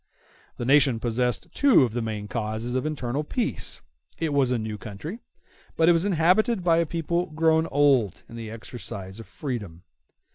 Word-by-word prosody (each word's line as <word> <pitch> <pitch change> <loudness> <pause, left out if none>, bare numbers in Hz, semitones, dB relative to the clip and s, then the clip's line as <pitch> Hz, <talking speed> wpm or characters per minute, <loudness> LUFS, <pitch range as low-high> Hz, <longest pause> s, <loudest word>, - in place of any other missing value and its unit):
The 120 - -3
nation 135 -3 +4
possessed 120 -2 -1
two 275 - +5
of 120 -4 -1
the 120 - -1
main 110 -2 -4
causes 110 +2 -3
of 130 +4 0
internal 145 -2 -2
peace; 230 +9 -2 0.3
it 160 -1 -1
was 140 -3 +3
a 125 - +2
new 110 -1 -4
country, 150 - -7 0.6
but 165 - +4
it - - +8
was 170 +3 +2
inhabited 190 +4 +3
by 165 -2 +4
a 170 -1 +2
people 170 +2 -1
grown 160 +1 +2
old 140 - +2
in 115 - -11
the 115 -2 -6
exercise 110 -3 -8
of 115 - -10
freedom. 105 - -6
130 Hz, 175 wpm, -25 LUFS, 115-165 Hz, 0.6 s, it